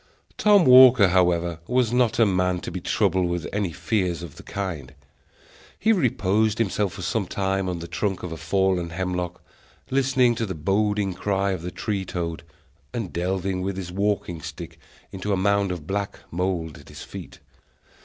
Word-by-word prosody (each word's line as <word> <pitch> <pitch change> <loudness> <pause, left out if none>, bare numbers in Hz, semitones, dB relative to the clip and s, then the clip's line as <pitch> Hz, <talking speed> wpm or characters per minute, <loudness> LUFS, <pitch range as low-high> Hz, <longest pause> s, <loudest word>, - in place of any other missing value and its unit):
Tom 205 -4 +5
Walker, 125 -5 +8
however, 85 -2 +2
was 125 -2 +1
not 120 -3 +2
a 115 - +5
man 90 -2 +1
to - - -6
be - - -5
troubled 95 -1 +1
with 85 -1 -2
any 100 -3 -1
fears 90 +1 -1
of 80 -5 -9
the - - -11
kind. 80 -9 -5 0.8
He 220 - +2
reposed 110 - +1
himself 105 -3 0
for - - -7
some - - -1
time 95 -1 -1
on 90 - -2
the 85 0 -7
trunk 95 +1 -2
of 90 - -5
a - - -4
fallen 90 +1 0
hemlock, 90 0 -3 0.5
listening 130 -2 +3
to 115 -1 -2
the 95 - -4
boding 100 +4 0
cry 100 +1 0
of 95 -3 -3
the 90 - -4
tree 100 +1 -3
toad, 85 -3 -4 0.5
and 110 -7 -4
delving 95 +1 -1
with 95 0 -3
his 90 -2 -5
walking 95 -3 -1
staff - - -7 0.4
into 100 +2 -3
a - - +1
mound 100 0 +2
of 85 -5 -5
black 100 +3 -3
mould 85 -3 -2
at - - -16
his - - -9
feet. - - -9
95 Hz, 175 wpm, -24 LUFS, 90-105 Hz, 0.8 s, Walker